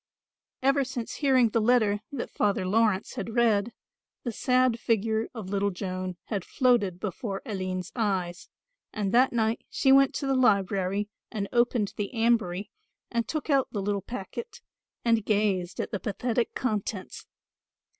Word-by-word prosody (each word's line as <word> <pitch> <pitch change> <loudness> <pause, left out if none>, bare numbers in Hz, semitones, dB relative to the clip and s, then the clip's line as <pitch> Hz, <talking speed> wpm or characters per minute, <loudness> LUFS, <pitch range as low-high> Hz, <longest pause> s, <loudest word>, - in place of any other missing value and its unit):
Ever 275 +1 +4
since 250 -3 -5
hearing 260 -5 +4
the 225 +1 +1
letter 215 -3 +3
that 275 -4 -4
Father 200 -2 +1
Laurence 210 0 +2
had 225 - -5
read, 230 -2 +3 0.5
the 240 - -2
sad 250 0 +2
figure 220 0 +1
of 210 -5 -6
little 200 0 +1
Joan 185 -1 -4
had 200 -4 -3
floated 225 -9 +2
before 195 0 -4
Aline's 185 -5 -3
eyes, 190 -6 -1 0.4
and 205 -3 -2
that 250 +3 +5
night 225 -1 0
she 265 - +2
went 275 0 +5
to 280 - -2
the 270 - +1
library 200 -5 +2 0.2
and 205 -3 -3
opened 240 -3 +2
the 205 -1 -2
ambry 225 -5 +1 0.4
and 235 -1 0
took 310 -2 -3
out 275 -2 +3
the 205 - -1
little 200 0 -1
packet 250 - -7 0.5
and 230 -2 +3
gazed 200 -4 0
at - - -3
the 205 - -2
pathetic 230 +4 -1
contents. 210 -5 -3
220 Hz, 150 wpm, -27 LUFS, 195-240 Hz, 0.5 s, that